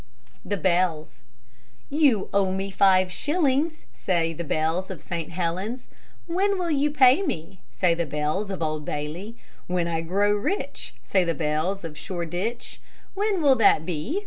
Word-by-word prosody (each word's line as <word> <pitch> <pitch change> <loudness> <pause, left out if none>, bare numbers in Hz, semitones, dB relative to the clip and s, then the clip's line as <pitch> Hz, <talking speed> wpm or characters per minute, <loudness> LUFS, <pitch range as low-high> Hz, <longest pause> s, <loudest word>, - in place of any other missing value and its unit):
THE 205 - -2
BELLS 175 -4 0 0.7
"You 280 -9 +3
owe 195 -1 +2
me 195 +1 -3
five 185 -1 +4
shillings," 300 - 0
Say 165 -3 0
the 170 - -5
bells 160 +4 -1
of 185 -5 -6
St. 165 +1 -5
Helen's. 185 +8 -3 0.4
"When 385 +4 +1
will 350 -2 -1
you 295 0 +2
pay 270 +1 +5
me?" 185 - -4
Say 180 -3 +2
the 170 -1 -2
bells 150 +8 -1
of 190 -4 -3
Old 155 -1 -2
Bailey. 160 +11 -5 0.3
"When 180 -1 0
I 165 -1 -1
grow 195 +5 +1
rich," 215 - -3
Say 190 -2 +2
the 170 -1 -1
bells 160 +5 -1
of 155 -3 -7
Shoreditch. 180 +6 -4 0.3
"When 400 -3 0
will 275 -2 +6
that 160 -8 +4
be?" 180 - -2
185 Hz, 155 wpm, -25 LUFS, 165-255 Hz, 0.7 s, will